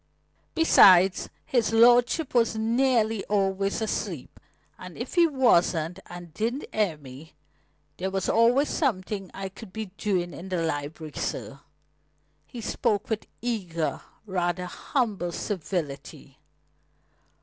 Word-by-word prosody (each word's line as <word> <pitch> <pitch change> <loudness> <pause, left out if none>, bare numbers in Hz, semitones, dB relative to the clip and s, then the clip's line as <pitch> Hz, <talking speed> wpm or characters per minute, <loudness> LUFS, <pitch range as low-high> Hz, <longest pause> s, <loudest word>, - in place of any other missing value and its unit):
Besides, 190 - +6 0.2
his 240 -4 +1
lordship 245 +5 +4
was 230 -2 +2
nearly 225 -1 +1
always 195 +1 0
asleep; 220 - -4 0.4
and - - -10
if - - -6
he 345 -2 +5
wasn't 180 - +2
and 175 -2 -10
did 235 - -2
'ear 205 -8 0
me, 140 +2 -13 0.6
there 190 +1 -2
was 195 0 -2
always 240 +6 +4
something 200 - -2
I 195 0 -6
could 195 +1 -12
be 220 -2 -6
doing 180 -4 -1
in 185 +3 -9
the 180 -3 -1
library, 155 0 -4
sir." 140 - -4 0.9
He 240 - -8
spoke 210 0 -1
with 220 - -2 0.2
eager, 180 -9 -2 0.2
rather 180 -2 -1
humble 200 -2 -2
civility. 155 -7 -5
195 Hz, 115 wpm, -26 LUFS, 175-230 Hz, 0.9 s, Besides